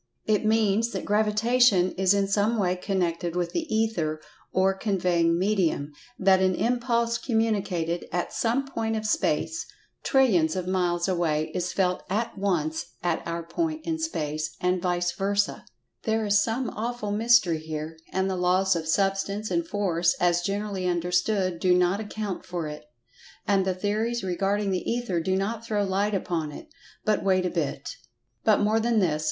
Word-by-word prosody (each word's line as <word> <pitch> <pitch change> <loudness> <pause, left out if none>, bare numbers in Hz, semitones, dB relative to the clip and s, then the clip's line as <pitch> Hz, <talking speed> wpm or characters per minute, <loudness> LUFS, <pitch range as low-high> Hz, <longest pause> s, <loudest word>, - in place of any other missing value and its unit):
It 215 -1 +2
means 220 +1 +2
that - - -4
Gravitation 210 -2 +3
is 190 +1 +2
in 200 -1 +1
some 205 +3 +1
way 185 -3 +1
connected 175 -3 -2
with 175 -1 -1
the 330 -2 -3
Ether, 200 -9 0 0.3
or 190 +1 +3
"conveying 180 -4 +1
medium," 180 -6 0 0.3
that 190 -1 +4
an 185 -1 +2
impulse 235 -1 0
communicated 200 -8 -1
at 175 0 -2
some 240 +4 0
point 225 -4 -2
of 215 0 -3
space 215 - 0 0.3
trillions 190 - +3
of 185 -1 -2
miles 175 -2 0
away 165 -4 0
is 180 0 -2
felt 180 -2 0
at 220 +5 -1
once 170 -6 -1
at 175 -2 0
our 170 0 -3
point 315 - -3
in 325 -1 -2
space, 155 - -3
and 180 0 +1
vice 175 -1 0
versa. 200 +1 -1 0.4
There 220 -1 0
is 205 0 +4
some 235 +3 -1
awful 230 -2 -3
mystery 210 -6 +3
here, 155 0 -6
and 190 0 0
the 190 - -1
laws 185 +1 +2
of 160 -1 -3
Substance, 195 +4 0
and 335 -1 0
Force, 175 - +1
as 175 0 +3
generally 200 0 -2
understood, 180 +1 0
do 180 0 +3
not 180 +2 +2
account 210 -3 -4
for 175 -3 -4
it. 150 -4 -8 0.6
And 195 -2 +3
the 190 -1 0
theories 215 +5 -1
regarding 195 +2 0
the 185 - 0
Ether 235 -7 -1
do 185 +3 0
not 215 +4 -2
throw 210 -3 0
light 200 +2 0
upon 165 -5 -2
it. 310 - -11 0.4
But 215 -1 +1
wait 185 -1 +2
a 180 - -1
bit! 145 -4 -3 0.5
But 215 - +4
more 215 +2 +3
than 230 0 +1
this. 165 -7 +2
195 Hz, 165 wpm, -26 LUFS, 175-215 Hz, 0.6 s, that